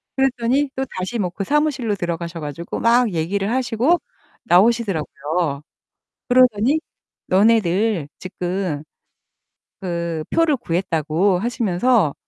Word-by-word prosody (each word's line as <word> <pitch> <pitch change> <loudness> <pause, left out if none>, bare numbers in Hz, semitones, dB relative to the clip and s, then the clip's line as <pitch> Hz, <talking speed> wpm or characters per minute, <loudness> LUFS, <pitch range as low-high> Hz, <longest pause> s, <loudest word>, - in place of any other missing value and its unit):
그랬더니 265 +1 +1
또 265 0 -1
다시 200 +6 -3
뭐 180 -3 0
그 195 +3 -5
사무실로 280 -6 0
들어가셔 170 -1 -4
가지고 150 +3 -5
막 235 -3 +3
얘기를 195 +5 -1
하시고 260 +6 +2 0.4
나오시더라고요. 175 -8 +1 0.7
그러더니 250 +3 +4 0.5
너네들 200 -4 +2
지금 180 -4 -3 1.0
그 170 -3 -3
표를 325 -4 +3
구했다고 170 - 0
하시면서 225 - +1
200 Hz, 265 characters per minute, -21 LUFS, 170-240 Hz, 1.0 s, 그러더니